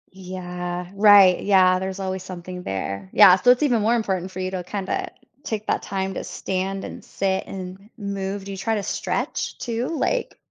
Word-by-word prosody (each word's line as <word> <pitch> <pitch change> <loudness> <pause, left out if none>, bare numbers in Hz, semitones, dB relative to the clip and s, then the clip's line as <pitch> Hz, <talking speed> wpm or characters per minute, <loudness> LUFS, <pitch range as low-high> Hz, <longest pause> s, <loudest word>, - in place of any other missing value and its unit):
Yeah, 180 -1 -5
right, 200 -3 +7
yeah, 185 -2 +4
there's 190 +1 -4
always 190 -1 -3
something 180 0 -8
there. 95 - -4
Yeah, 195 -3 +9
so 190 +6 +2
it's 250 +4 +5
even 245 -7 +2
more 225 +3 +3
important 190 -5 -1
for 185 - -8
you 185 0 -2
to 185 -2 -4
kinda 195 +1 -3 0.3
take 215 -1 -4
that - - 0
time 190 0 -3
to - - -5
stand 195 +1 -3
and - - -9
sit 190 -1 -1
and 190 +2 -8
move. 200 -1 -4
Do 200 - -6
you 195 - -6
try 225 +4 -1
to 205 - -2
stretch - - -3
too? 235 +1 -3
Like 455 +9 -1
190 Hz, 190 wpm, -23 LUFS, 185-205 Hz, 0.3 s, Yeah